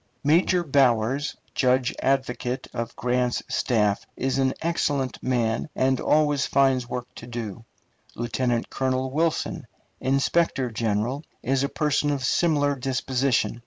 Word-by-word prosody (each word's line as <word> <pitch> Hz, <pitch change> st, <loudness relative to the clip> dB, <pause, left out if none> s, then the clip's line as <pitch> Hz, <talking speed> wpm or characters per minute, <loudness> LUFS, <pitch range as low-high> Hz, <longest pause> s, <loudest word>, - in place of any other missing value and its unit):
Major 175 Hz, +4 st, +3 dB
Bowers, 135 Hz, -2 st, +2 dB, 0.2 s
judge 130 Hz, -1 st, +2 dB
advocate 130 Hz, -2 st, -1 dB
of 115 Hz, -1 st, -4 dB
Grant's 125 Hz, 0 st, 0 dB
staff, 105 Hz, -4 st, +1 dB
is 135 Hz, +1 st, 0 dB
an 130 Hz, 0 st, +1 dB
excellent 145 Hz, -6 st, -1 dB
man, 120 Hz, +1 st, 0 dB
and 130 Hz, 0 st, +2 dB
always 145 Hz, -2 st, +2 dB
finds 130 Hz, -3 st, +2 dB
work 125 Hz, -1 st, -3 dB
to -, -, -10 dB
do. 115 Hz, -2 st, -6 dB, 0.5 s
Lieutenant 120 Hz, 0 st, -1 dB
Colonel 130 Hz, 0 st, -1 dB
Wilson, 160 Hz, +3 st, -1 dB, 0.3 s
inspector 135 Hz, -1 st, +1 dB
general, 115 Hz, +5 st, -1 dB, 0.2 s
is 135 Hz, +2 st, +1 dB
a 140 Hz, -, 0 dB
person 150 Hz, -1 st, +1 dB
of 140 Hz, -3 st, -1 dB
similar 145 Hz, -1 st, +2 dB
disposition. 130 Hz, -3 st, 0 dB
130 Hz, 125 wpm, -25 LUFS, 120-140 Hz, 0.5 s, Major